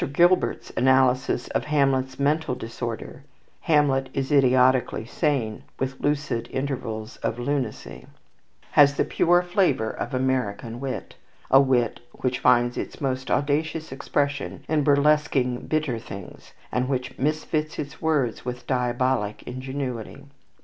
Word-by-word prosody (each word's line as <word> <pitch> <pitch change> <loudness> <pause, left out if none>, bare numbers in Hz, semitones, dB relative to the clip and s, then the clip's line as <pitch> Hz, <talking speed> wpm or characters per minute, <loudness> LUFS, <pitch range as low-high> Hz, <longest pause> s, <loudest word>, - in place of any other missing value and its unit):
Gilbert's 175 +4 +2
analysis 130 -1 +3
of - - -1
Hamlet's 135 -3 +1
mental 145 -1 +1
disorder, 115 -1 -6 0.4
"Hamlet 140 -4 +2
is 135 +1 -2
idiotically 130 -4 +3
sane, 125 -5 -1 0.2
With 130 0 -3
lucid 145 -5 -1
intervals 125 -5 -4
of 115 - -2
lunacy," 125 -2 -3 0.6
has 145 -1 +6
the - - +1
pure 175 +1 +3
flavour 175 - +1
of 130 - -4
American 125 -3 -1
wit, 135 -1 -5 0.4
a 135 - +8
wit 125 -4 +1
which 125 0 -2
finds 120 0 +3
its - - -6
most 130 -2 -2
audacious 155 +2 0
expression 140 +1 -2
in 155 -2 +1
burlesquing 140 -3 +2
bitter 150 -7 0
things, 100 -5 -10 0.2
and 125 +1 0
which 130 -2 -3
misfits 155 +2 -1
its 145 -1 -6
words 145 -8 0
with 125 0 -5
diabolic 125 -3 0
ingenuity. 130 0 -5
130 Hz, 120 wpm, -25 LUFS, 125-145 Hz, 0.6 s, a